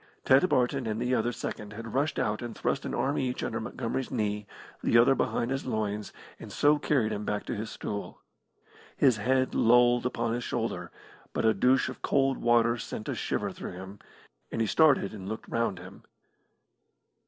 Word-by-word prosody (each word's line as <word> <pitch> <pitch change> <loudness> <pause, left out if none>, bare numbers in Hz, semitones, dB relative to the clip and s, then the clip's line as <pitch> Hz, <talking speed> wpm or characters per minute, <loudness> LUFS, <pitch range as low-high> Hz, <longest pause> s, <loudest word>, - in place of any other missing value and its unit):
Ted 135 +8 +5
Barton 125 0 +1
and 110 0 -2
the 125 +1 0
other 120 0 +1
second 105 -3 -6
had 115 +1 -7
rushed 145 +4 0
out 105 0 0
and 120 -1 -6
thrust - - -1
an - - -3
arm 140 +2 0
each 125 -1 -2
under - - -2
Montgomery's 130 - -3
knee, 105 -3 -2 0.3
the 115 - +3
other 120 +3 +6
behind 120 -1 -1
his 135 0 -2
loins, 105 -3 -2 0.3
and - - -9
so 150 +1 +3
carried 130 -7 +1
him 105 - -3
back 105 0 -2
to - - -3
his 110 +1 -4
stool. 100 -1 -6 0.8
His 130 -5 +4
head 130 +4 +1
lolled 120 +1 +4
upon 115 -2 -2
his 120 +1 -2
shoulder, 110 -7 -3 0.4
but - - -1
a 110 - +5
douche 125 +6 +3
of - - -7
cold 135 -1 +1
water 120 0 +3
sent 110 -1 -6
a - - 0
shiver - - -2
through - - -7
him, 95 +2 -9 0.5
and - - -3
he 115 - +2
started 145 -5 +3
and 100 -2 -7
looked 110 - -6
round 115 -5 -1
him. 95 +2 -11
115 Hz, 190 wpm, -29 LUFS, 105-130 Hz, 0.8 s, other